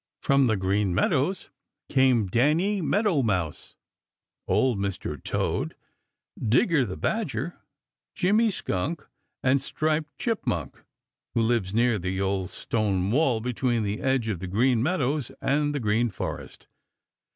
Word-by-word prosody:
From 140 -1 +4
the 110 -2 +2
Green 95 0 0
Meadows 150 - 0 0.4
came 130 -5 +3
Danny 155 - +2
Meadow 195 -2 +2
Mouse, 95 - -2 0.7
Old 125 -6 +2
Mr. 100 -1 -4
Toad, - - -1 0.7
Digger 125 - +3
the - - -5
Badger, - - -2 0.6
Jimmy 215 +5 +3
Skunk, 155 - -3 0.4
and 130 +1 +3
Striped 155 +1 -2
Chipmunk, 145 - -2 0.5
who 115 - +3
lives 110 -4 0
near 120 -2 +3
the 95 +1 -3
old 95 -1 -1
stone 100 -4 -1
wall 125 -4 +2
between 120 -1 0
the 105 +1 -3
edge 130 -4 +1
of 105 -6 -2
the 95 - -5
Green 115 +5 +2
Meadows 145 -3 0
and 145 +1 +1
the - - 0
Green 115 +1 +1
Forest. 100 - -6
120 Hz, 130 wpm, -26 LUFS, 100-145 Hz, 0.7 s, From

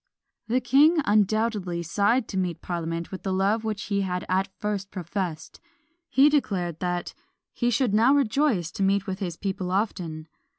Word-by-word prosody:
The 250 +3 +1
king 290 +7 +5
undoubtedly 205 -4 +1
sighed 205 +8 +1
to - - -6
meet 180 -3 -2
parliament 170 -1 -4
with 190 - -6
the 195 - -3
love 200 +4 +1
which 215 -2 -3
he 200 -1 -1
had 180 -1 -2
at 190 +1 0
first 205 -2 -3
professed; 175 -3 -5 0.5
he 275 +2 +5
declared 190 - 0
that 175 -1 -2 0.4
"he 240 - 0
should 245 -2 +1
now 235 +6 +5
rejoice 240 - +1
to - - -6
meet 195 0 +2
with 190 0 -4
his 175 -4 -4
people 190 -2 -3
often." 175 -5 -2
195 Hz, 165 wpm, -26 LUFS, 180-220 Hz, 0.5 s, king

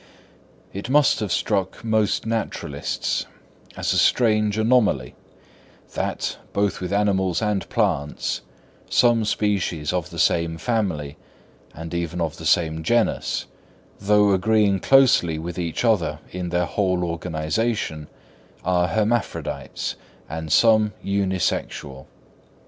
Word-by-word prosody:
It 100 +5 -6
must 145 +1 +4
have 105 -4 -3
struck 100 -1 -1
most 110 -2 +1
naturalists 110 -10 -2 0.5
as - - 0
a - - +2
strange 110 -3 +3
anomaly 110 - +2 0.8
that, - - -2 0.2
both 100 -1 0
with 90 - -4
animals 95 -3 +1
and 105 -3 -1
plants, 85 - -1 0.5
some 120 -2 +3
species 95 -7 -1
of 90 -1 -2
the 85 - -10
same 85 0 +1
family 85 - -2 0.6
and 80 +2 -7
even 85 0 -3
of 80 -3 -2
the - - -4
same 80 -2 +2
genus, 120 +7 0 0.5
though 105 0 +4
agreeing 100 0 +2
closely 125 -11 +4
with 85 +2 -5
each 85 +6 -2
other 110 -7 +2
in 90 -1 -4
their 90 0 +1
whole 90 -2 0
organisation, 85 +1 -2 0.6
are 90 -1 +2
hermaphrodites, 110 +1 -2 0.3
and 80 -1 -6
some 110 +1 +4
unisexual. 95 -8 -2
95 Hz, 115 wpm, -23 LUFS, 85-110 Hz, 0.8 s, must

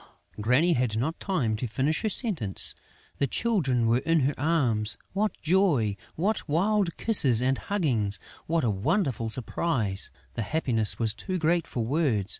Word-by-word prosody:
Granny 125 +11 +2
had 120 -5 -1
not 150 +8 -2
time 140 - -1
to 120 +3 -4
finish 140 +8 -1
her 220 - -1
sentence. 170 - +2 0.5
The 140 - +1
Children 140 - 0
were 115 +2 +2
in 165 +3 +1
her 135 +2 +1
arms!... 125 -8 0 0.2
What 210 +2 -1
joy! 155 - +2 0.2
What 195 0 -2
wild 190 +3 0
kisses 140 - +6
and 130 +2 0
huggings! 125 - -1 0.3
What 165 -1 0
a 115 - +1
wonderful 120 - -1
surprise! 115 - -1 0.2
The 115 - -4
happiness 115 -3 +1
was 110 -2 +1
too 185 - -4
great 170 0 0
for 120 -3 -3
words. 120 - 0
135 Hz, 155 wpm, -26 LUFS, 115-170 Hz, 0.5 s, kisses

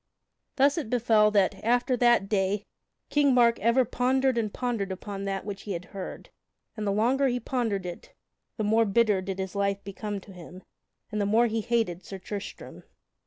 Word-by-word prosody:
Thus 280 +3 +3
it 280 - -5
befell 225 -3 +4
that, 200 -3 +1
after 245 +3 +2
that 240 -4 +3
day, 200 0 0 0.5
King 285 -3 +3
Mark 235 -1 +4
ever 235 +3 +3
pondered 260 +2 +1
and 220 -3 -1
pondered 230 -6 -2
upon 195 +1 -6
that 195 -1 -3
which 200 -2 -6
he 205 - -5
had 175 +1 -5
heard, 195 -2 -7 0.4
and 215 -2 -3
the - - +2
longer 250 +7 +2
he 245 -1 0
pondered 225 -8 -2
it, 175 -1 -8 0.5
the 215 - -1
more 220 +2 +3
bitter 210 -2 +2
did 190 0 -5
his 190 -1 -4
life 200 0 -1
become 200 +1 -5
to 195 - -14
him, 180 +1 -12 0.5
and 210 -1 -1
the 200 - +1
more 225 +3 +4
he 225 -1 -1
hated 215 -6 -1
Sir 195 - -7
Tristram. 200 +2 -8
210 Hz, 185 wpm, -27 LUFS, 195-240 Hz, 0.5 s, befell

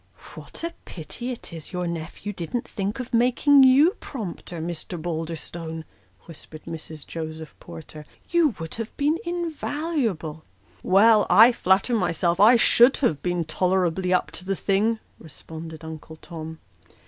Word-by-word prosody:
" - - -15
What - - -10
a 335 0 -3
pity 210 +9 -7
it 235 -7 -8
is 160 -2 -8
your 180 0 -2
nephew 170 +4 -5
didn't 205 +8 -4
think 205 +4 -3
of 250 0 -6
making 255 +4 +5
you 270 +6 +6
prompter, 180 - -7
Mr. 170 +1 -5
Balderstone! 160 0 -5 0.2
" 95 0 -34
whispered 155 -1 -11
Mrs. 160 -2 -8
Joseph 160 -1 -7
Porter; 160 -3 -11
" - - -34
you 330 - +3
would 160 0 -6
have 225 - -8
been 300 +3 +1
invaluable." 300 - -3 0.4
"Well, 210 +3 +5
I 220 +7 +8
flatter 195 +1 +2
myself, 175 -2 +1
I 220 +5 +8
should 240 +2 +5
have 165 - 0
been 175 -2 -1
tolerably 180 +2 0
up 180 - +1
to - - -8
the 195 +1 -1
thing," 210 +4 +1 0.2
responded 160 +1 -9
Uncle 160 0 -9
Tom. 160 -1 -8
180 Hz, 150 wpm, -24 LUFS, 160-235 Hz, 0.4 s, I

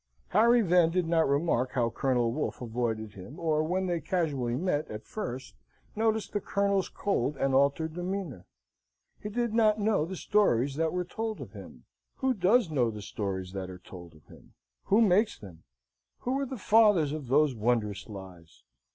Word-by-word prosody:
Harry 230 +4 +4
then 175 -3 +4
did 175 0 0
not 165 -3 +2
remark 140 -4 +1
how 120 -3 +1
Colonel 125 -3 +1
Wolfe 150 +6 -3
avoided 115 -3 -3
him, 100 - -11
or 155 -2 +1
when 180 +4 -1
they 175 -2 -1
casually 145 -10 -1
met, 155 0 -1
at 105 0 -7
first, 130 - -6 0.4
notice 220 -1 +1
the 205 - -3
Colonel's 200 -1 0
cold 150 -8 -1
and 135 0 0
altered 140 +4 +2
demeanour. 175 - -5 0.7
He 210 - -5
did 235 +1 -1
not 220 -2 +3
know 205 -6 +2
the 190 +3 -6
stories 140 - +2
that 160 0 +1
were 180 0 -2
told 220 +4 -4
of - - -8
him. - - -12 0.3
Who 265 -1 0
does 200 -1 +3
know 125 -6 +2
the 105 -2 -7
stories 95 -3 -4
that 95 -1 -5
are 90 - -8
told 85 -3 -12
of 75 - -21
him? - - -18 0.3
Who 210 +4 +4
makes 210 +1 +3
them? 85 -6 -13 0.6
Who 260 +2 -1
are 275 - -2
the 260 - -6
fathers 205 -8 +4
of 150 -4 -5
those 145 +2 +3
wondrous 110 -3 -1
lies? 95 -5 -12
155 Hz, 175 wpm, -29 LUFS, 120-200 Hz, 0.7 s, Harry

